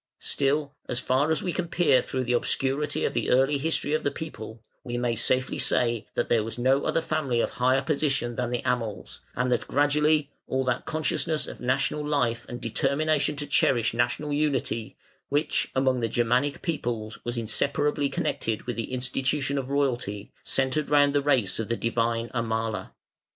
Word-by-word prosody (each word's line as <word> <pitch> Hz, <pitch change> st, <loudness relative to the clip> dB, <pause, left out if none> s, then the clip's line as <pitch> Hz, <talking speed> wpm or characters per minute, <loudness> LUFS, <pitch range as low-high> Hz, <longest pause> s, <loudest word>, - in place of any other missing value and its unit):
Still, 145 Hz, +1 st, 0 dB, 0.2 s
as 125 Hz, -, -1 dB
far 130 Hz, +4 st, +1 dB
as 160 Hz, -, 0 dB
we 180 Hz, -, -1 dB
can 180 Hz, -, -2 dB
peer 150 Hz, -7 st, +3 dB
through 130 Hz, +1 st, -3 dB
the 125 Hz, 0 st, 0 dB
obscurity 135 Hz, +4 st, 0 dB
of -, -, -1 dB
the -, -, -1 dB
early 135 Hz, +3 st, +3 dB
history 155 Hz, 0 st, 0 dB
of 155 Hz, -, +1 dB
the -, -, +1 dB
people, 110 Hz, -8 st, -8 dB, 0.2 s
we 120 Hz, 0 st, -4 dB
may 120 Hz, -1 st, 0 dB
safely 130 Hz, +4 st, 0 dB
say 115 Hz, -2 st, +1 dB
that -, -, 0 dB
there 115 Hz, -2 st, +2 dB
was 115 Hz, +2 st, -6 dB
no 130 Hz, +3 st, +2 dB
other 165 Hz, -, +1 dB
family 155 Hz, -7 st, -1 dB
of -, -, 0 dB
higher 130 Hz, +2 st, +2 dB
position 140 Hz, -4 st, 0 dB
than 125 Hz, 0 st, -1 dB
the 120 Hz, -1 st, -2 dB
Amals, 115 Hz, -4 st, -2 dB, 0.2 s
and 125 Hz, +1 st, 0 dB
that 120 Hz, -, 0 dB
gradually 150 Hz, +1 st, +2 dB, 0.2 s
all 130 Hz, 0 st, 0 dB
that 125 Hz, -1 st, -1 dB
consciousness 155 Hz, 0 st, 0 dB
of -, -, -9 dB
national 135 Hz, +4 st, 0 dB
life 125 Hz, -6 st, 0 dB
and 120 Hz, -, -5 dB
determination 150 Hz, +6 st, +1 dB
to 145 Hz, +1 st, +2 dB
cherish 125 Hz, -5 st, +2 dB
national 120 Hz, +5 st, 0 dB
unity, 135 Hz, -6 st, -1 dB, 0.3 s
which 145 Hz, +1 st, +1 dB
among 130 Hz, -1 st, +2 dB
the 115 Hz, -1 st, -1 dB
Germanic 125 Hz, +4 st, +1 dB
peoples 115 Hz, -, -3 dB
was 120 Hz, 0 st, -3 dB
inseparably 145 Hz, +5 st, 0 dB
connected 115 Hz, -4 st, -2 dB
with 120 Hz, 0 st, -4 dB
the 115 Hz, -, -4 dB
institution 135 Hz, +2 st, 0 dB
of 130 Hz, -1 st, -5 dB
royalty, 125 Hz, -7 st, -1 dB
centred 135 Hz, +3 st, 0 dB
round 145 Hz, -1 st, +4 dB
the 145 Hz, -, +3 dB
race 125 Hz, -10 st, +1 dB
of 115 Hz, -, -2 dB
the 115 Hz, -, 0 dB
divine 115 Hz, 0 st, 0 dB
Amala. 110 Hz, -4 st, -2 dB
130 Hz, 175 wpm, -26 LUFS, 120-145 Hz, 0.3 s, round